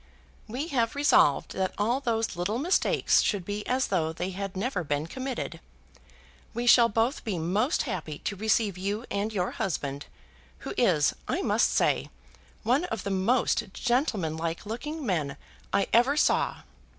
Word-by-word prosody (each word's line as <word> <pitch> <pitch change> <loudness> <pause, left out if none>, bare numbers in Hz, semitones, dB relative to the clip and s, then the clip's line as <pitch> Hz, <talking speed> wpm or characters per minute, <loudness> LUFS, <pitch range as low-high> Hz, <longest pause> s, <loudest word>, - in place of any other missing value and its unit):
"We 260 +9 -4
have 235 -5 0
resolved 285 - +4
that 190 -1 -2
all 230 +5 +1
those 230 -6 -1
little 180 +6 -1
mistakes 335 +9 +3
should 200 -5 -1
be 205 +1 -3
as 255 +1 +1
though 160 -5 +1
they 180 +3 -4
had 195 0 -5
never 200 -3 -1
been 145 0 -1
committed. 260 +7 -5 1.0
We 240 +1 -2
shall 240 -1 +7
both 230 +6 0
be 205 -5 -2
most 195 - +1
happy 170 - -4
to 205 - -4
receive 215 -2 +1
you 205 +5 -2
and 200 +2 -1
your 185 -3 -1
husband, 145 -6 -3 0.6
who - - -4
is, - - +3
I - - -1
must - - +3
say, - - +1 0.5
one 255 +9 +2
of 225 - -4
the 200 - -3
most 210 +1 +1
gentlemanlike 170 - -1
looking 285 +8 -5
men 150 - -1 0.3
I 200 - +2
ever 255 +5 +4
saw. - - +2
210 Hz, 155 wpm, -28 LUFS, 180-245 Hz, 1.0 s, shall